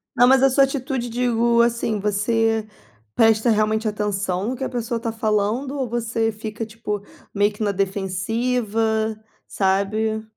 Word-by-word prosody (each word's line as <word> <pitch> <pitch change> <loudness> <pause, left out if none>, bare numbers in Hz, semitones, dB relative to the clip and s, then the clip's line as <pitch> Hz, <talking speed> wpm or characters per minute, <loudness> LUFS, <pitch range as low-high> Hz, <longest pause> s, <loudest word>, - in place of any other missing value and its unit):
Não, 245 - +6
mas 265 +1 +5
a 270 - +6
sua 275 +2 +4
atitude, 265 -2 -3
digo 235 -1 +2
assim, 235 -2 0
você 220 +2 +1 0.5
presta 225 +1 +4
realmente 215 0 +1
atenção 205 -1 -1
no 255 - -2
que 265 - -6
a - - -2
pessoa 235 -1 -3
tá 230 -1 -3
falando? 220 +5 -1
Ou 260 -3 -2
você 225 -1 -1
fica 215 +1 -6
tipo 215 -2 -5 0.3
meio 205 +1 +2
que 210 +1 -5
na 205 - +1
defensiva, 220 +3 -1 0.3
sabe? 215 +3 0
220 Hz, 150 wpm, -22 LUFS, 210-235 Hz, 0.5 s, Não